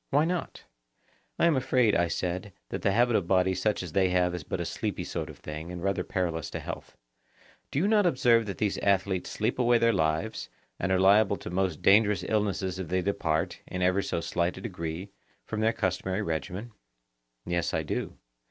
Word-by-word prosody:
Why 145 +3 +3
not? 175 +1 -3 0.7
I - - +3
am 170 -3 +4
afraid, 130 -4 +3
I 85 0 +3
said, 90 +3 -3 0.2
that - - -5
a 100 - +3
habit 120 +3 +3
of 90 - +1
body 95 0 +3
such 95 +2 0
as 90 - -7
they 95 +2 +3
have 90 -1 +2
is 90 -3 -4
but - - -4
a - - -2
sleepy - - -3
sort - - -4
of - - -10
thing, 75 +3 -7
and 90 -1 -6
rather 100 0 0
perilous 85 -5 -2
to - - -5
health. - - -8 0.7
Do - - -4
you 175 +7 +3
not 210 -3 +4
observe 120 -7 +3
that 100 - -4
these 105 -3 0
athletes 95 -2 +1
sleep 110 +4 -1
away 120 -1 +4
their 115 0 +3
lives, 80 +3 -1 0.3
and 95 - -1
are 95 - +3
liable 100 +2 +5
to - - -8
most 90 -3 -1
dangerous 105 +1 +5
illnesses 100 -3 0
if 95 - -4
they 90 +2 0
depart, 80 -5 -1
in 90 0 -3
ever 90 +2 +3
so 85 - -2
slight 85 +2 -1
a - - -7
degree, 90 -2 -5 0.3
from 110 - -4
their 110 +1 +3
customary 95 0 -1
regimen? 90 +7 -4 0.7
Yes, 85 -1 -1
I - - -1
do. - - -4
95 Hz, 200 wpm, -28 LUFS, 90-110 Hz, 0.7 s, liable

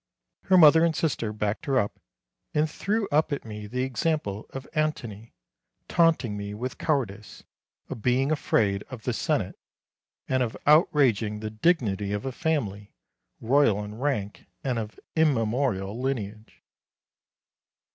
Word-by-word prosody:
Her 190 -1 +5
mother 160 -1 +8
and 165 -2 +2
sister 120 -8 -1
backed 105 +7 -3
her 135 -2 +2
up, 105 -4 -1 0.6
and 150 +1 +3
threw 205 +6 -1
up 155 +2 +2
at 140 - -3
me 105 -1 -7
the 125 +4 -2
example 130 -5 -2
of 135 0 -8
Antony, 120 -8 -3 0.5
taunting 160 -10 +2
me 100 0 -5
with 125 +4 -5
cowardice, 110 - -2 0.4
of 110 - -7
being 130 +5 +2
afraid 100 -9 +1
of 125 -5 -9
the 125 - -1
Senate, - - -1 0.7
and 130 0 +1
of 120 -3 -2
outraging 130 - +3
the 110 0 -5
dignity 110 - +1
of 105 +3 -3
a 135 - -2
family, 120 - -2 0.4
royal 115 -4 +3
in 105 0 -7
rank, 110 -5 -3 0.2
and 125 -4 -1
of 110 -1 -7 0.2
immemorial 120 - +1
lineage. 110 -5 -4
125 Hz, 135 wpm, -26 LUFS, 105-145 Hz, 0.7 s, mother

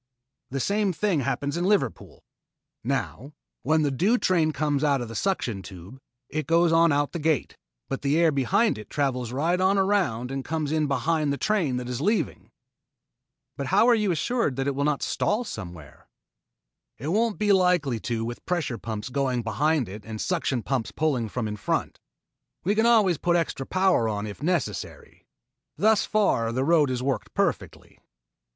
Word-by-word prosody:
The 135 - -3
same 200 +5 +1
thing 185 -2 0
happens 140 +3 -2
at - - -1
Liverpool. 185 - -1 0.6
Now, 140 +7 -3 0.3
when 155 +4 +2
the 145 - +1
due 195 - +2
train 170 -8 +2
comes 145 0 -1
out 140 -2 +2
of 120 -2 -5
the 115 - -8
suction 120 - -1
tube, 95 +6 -11 0.3
it 155 -3 -4
goes 170 +1 +3
on 165 0 +5
out 145 0 +1
the 170 - -4
gate, 155 -3 0 0.3
but 135 - -4
the 145 +2 +1
air 165 -1 +4
behind 190 - +1
it 105 - -11
travels 125 -5 -1
right 165 +8 0
on 190 +2 +3
around 180 - +1
and 135 0 -3
comes 155 0 -2
in 155 -1 +1
behind 155 +1 0
the 140 - -1
train 175 -12 0
that 125 -1 -5
is 125 +1 -4
leaving." 210 +7 -1 1.1
"But - - -4
how 230 - +4
are 245 - +6
you 210 -3 +1
assured 175 - 0
that 135 +1 -2
it 140 - 0
will 140 +1 -1
not 150 -2 0
stall 215 +4 0
somewhere?" 85 - -9 0.9
"It 140 +6 -5
won't 220 +3 +1
be 210 -1 +3
likely 180 -10 +2
to 115 0 -3
with 120 +1 -6
pressure 160 - -1
pumps 110 +1 -5
going 130 -2 -1
behind 140 +5 +1
it 100 +2 -9
and 110 +1 -7
suction 140 - -1
pumps 130 -5 -1
pulling 135 -8 -1
from 115 0 -3
in 105 0 -5
front. - - -2 0.6
We 200 - +2
can 220 +2 +3
always 210 -9 +4
put 175 -1 +1
extra 160 -5 -1
power 185 -12 +2
on 105 -1 -3
if 105 +3 -8
necessary. 150 - -3 0.5
Thus 215 0 +3
far 155 - +1
the 130 +3 -1
road 155 -2 +3
has 125 -1 -2
worked 130 -5 -3
perfectly." - - -2
145 Hz, 180 wpm, -25 LUFS, 125-180 Hz, 1.1 s, are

